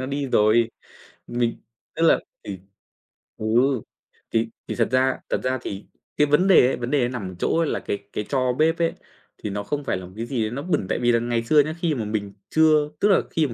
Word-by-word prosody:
nó 130 - -3
đi 140 0 -2
rồi. 110 +1 +3 0.6
Mình 120 -1 -1 0.4
tức 165 - -2
là - - +5 0.3
thì 95 -2 -6 0.8
ừ. 110 - -5 0.9
Thì 115 0 +1 0.2
thì - - -3
thật 115 - +2
ra 130 0 +2
thật - - 0
ra 130 0 0
thì 100 0 -6 0.3
cái 150 - +4
vấn 150 +7 +3
đề 170 -9 +7
ấy - - 0
,vấn 125 +2 -4
đề 135 -4 +2
nằm 120 -7 -5
ở - - -11
chỗ 165 - +1
là 160 - -1
cái 100 - -3 0.2
cái 105 - -2
tro 130 -2 +1
bếp 160 +4 +2
ấy, 165 -1 +1 0.4
thì 105 - -5
nó 100 +1 -3
không 145 +6 -3
phải 95 - -1
là 90 - -8
một 90 - -12
cái 115 - -4
gì 120 -1 -2
đấy 110 - -1
nó 135 +4 -4
bẩn 165 - 0
tại - - 0
vì 120 0 +3
là 115 - +3
ngày 120 0 -1
xưa 150 +6 +4
nhá, 155 +2 +2
khi 165 -3 0
mà 115 -4 -3
mình 105 -2 -3 0.2
chưa 155 -2 +4
tức 205 - +3
là 195 - +5
khi 155 -3 +1
mà 120 - -6
125 Hz, 245 wpm, -23 LUFS, 115-150 Hz, 0.9 s, đề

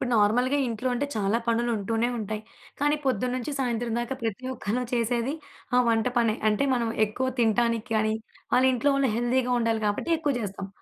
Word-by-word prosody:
ఇప్పుడు 250 - -2
నార్మల్‌గా 245 +7 +3
ఇంట్లో 235 +2 -2
అంటే 285 +4 -1
చాలా 210 +1 +1
పనులుంటూనే 230 -1 +1
ఉంటాయి, 215 0 -4 0.4
కానీ 295 +1 +3
పొద్దున్నుంచి 255 +1 -1
సాయంత్రం 240 -2 -1
దాకా 240 +3 -3
ప్రతి 225 +2 -3
ఒక్కళ్ళం 240 +2 -2
చేసేది 235 +2 0 0.4
ఆ - - +6
వంట 225 0 +2
పనే. 230 -2 +3
అంటే, 215 +5 +2
మనం 235 -2 0 0.2
ఎక్కువ 255 +5 -2
తింటానికి 230 +1 +2
కానీ, 215 0 +2 0.4
వాళ్ళింట్లో 260 +2 +3
వాళ్ళు 275 -3 +2
హెల్దీగా 250 +1 +1
ఉండాలి 225 -1 0
గాబట్టి 205 +11 0
ఎక్కువ 295 -3 0
జేస్తాం. 195 -2 -5
235 Hz, 160 wpm, -26 LUFS, 220-255 Hz, 0.4 s, ఆ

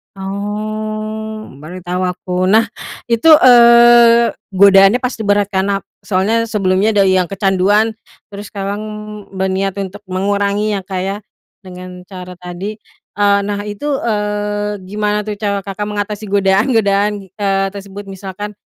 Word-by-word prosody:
Oh, 215 +2 -5
baru 175 +5 -9
tau 180 +1 -2
aku. 180 0 -2
Nah, 220 +4 +5 0.5
itu, 230 +7 +2
eee, 235 -2 +6 0.2
godaannya 195 +5 +6
pasti 230 -4 -3
berat, 205 0 +2
kan, 190 0 0
nap 200 -1 -1 0.2
soalnya 215 +4 +1
sebelumnya 205 0 +1
dari 195 -2 +4
yang 180 - +1
kecanduan 195 +3 +1 0.4
terus 200 +1 -8
sekarang 200 0 -3 0.6
berniat 190 0 -1
untuk 195 +2 -7
mengurangi 200 +2 0
ya 200 - -1
Kak 185 -2 -3
ya, 195 +2 -3 0.4
dengan 180 -1 -11
cara 185 -2 -9
tadi. 185 +4 -7 0.4
Eee, 200 0 +4
nah, 205 0 -3
itu, 210 +9 -4
eee, 210 -1 -2
gimana, 210 +1 -1
tuh, 210 - -3
cara 200 -1 -2
Kakak 195 +1 -5
mengatasi 210 0 -4
godaan-godaan, 200 +1 +2 0.2
eee, 195 -1 0
tersebut 200 0 -9
misalkan 195 +1 -7
205 Hz, 130 wpm, -16 LUFS, 195-215 Hz, 0.6 s, eee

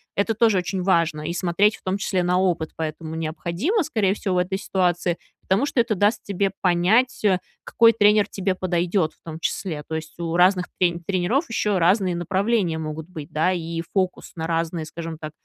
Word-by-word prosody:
это 205 +3 +1
тоже 220 -3 +3
очень 185 +1 -3
важно, 170 -4 +2
и 170 - -2
смотреть 185 +4 +2
в - - -26
том 190 +1 -1
числе 195 -2 0
на 180 +1 +2
опыт 175 -4 0
поэтому 160 0 -4
необходимо, 170 - -1
скорее 220 -11 +1
всего, 195 -2 -2
в - - +2
этой 180 +2 0
ситуации, 180 -2 0 0.2
потому 195 +8 +1
что 280 - -1
это 230 -2 -1
даст 205 +3 +1
тебе 200 0 -1
понять, 195 +8 +2
э, 190 -3 +4 0.3
какой 230 0 +5
тренер 210 -1 +4
тебе 195 -2 -1
подойдет 175 -2 0
в - - -33
том 160 -1 -7
числе. 165 -3 -3
То 160 - -2
есть 155 -1 -7
у 170 -1 -2
разных 180 0 +4
трень 175 -1 +1
тренеров 200 - 0
еще 210 -4 0
разные 180 +1 +3
направления 185 0 0
могут 155 +1 -6
быть, 155 -5 -9
да? 160 +4 +2
И 165 -2 -3
фокус 185 -2 -1
на 160 -1 -4
разные, 165 0 -1
скажем 165 0 -7
так, 155 -1 -7
180 Hz, 195 wpm, -23 LUFS, 165-200 Hz, 0.3 s, какой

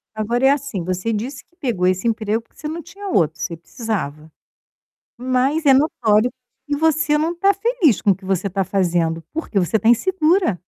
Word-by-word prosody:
Agora 235 +4 -1
é - - +6
assim, 280 - -2
você 185 +5 -2
disse 250 +6 -4
que 345 - -37
pegou 220 - -1
esse 185 +4 +1
emprego 220 0 0
porque - - -31
você 300 - -4
não 330 +2 -5
tinha 395 +5 -9
outro, 160 - +1
você 165 +2 -3
precisava. 165 - -5 0.9
Mas 260 +5 0
é 275 - +7
notório 245 -5 +2 0.4
que 290 -1 -1
você 315 -1 +2
não 325 +3 -1
tá 390 +3 +3
feliz 395 - +2
com 200 - +4
o - - +1
que 195 - -21
você 190 0 0
tá 195 +1 -1
fazendo, 170 -3 0
porque 310 -10 -1
você 190 +5 +1
tá 225 +4 +2
insegura. 345 - +2
235 Hz, 190 wpm, -20 LUFS, 190-305 Hz, 0.9 s, é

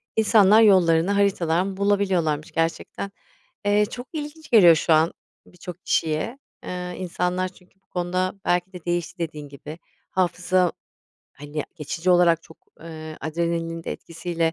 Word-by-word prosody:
İnsanlar 215 -1 +6
yollarını 180 -3 +5
haritadan 190 -2 +1
bulabiliyorlarmış 190 -7 +1
gerçekten. 165 +4 -2 0.5
Eee, 205 +1 +4
çok 245 +3 -8
ilginç 310 +1 -7
geliyor 180 -8 +8
şu 160 +1 +2
an 160 +2 +3 0.3
birçok 180 0 -10
kişiye. 160 - 0 0.2
Eee, 180 0 -5
insanlar 180 0 -1
çünkü 180 0 -19
bu - - -48
konuda 185 +2 -2
belki 175 +2 0
de 180 -2 -10
değişti 175 +1 -2
dediğin 150 -3 -5
gibi. 150 +3 -10 0.3
Hafıza, 180 -1 +1 0.6
hani, 145 +1 -5
geçici 170 +3 -2
olarak 170 -2 +4
çok, 160 - -16 0.2
eee, 155 -1 -8
adrenalinin 165 +1 -2
de - - -3
etkisiyle 165 0 -3
175 Hz, 130 wpm, -24 LUFS, 165-190 Hz, 0.6 s, geliyor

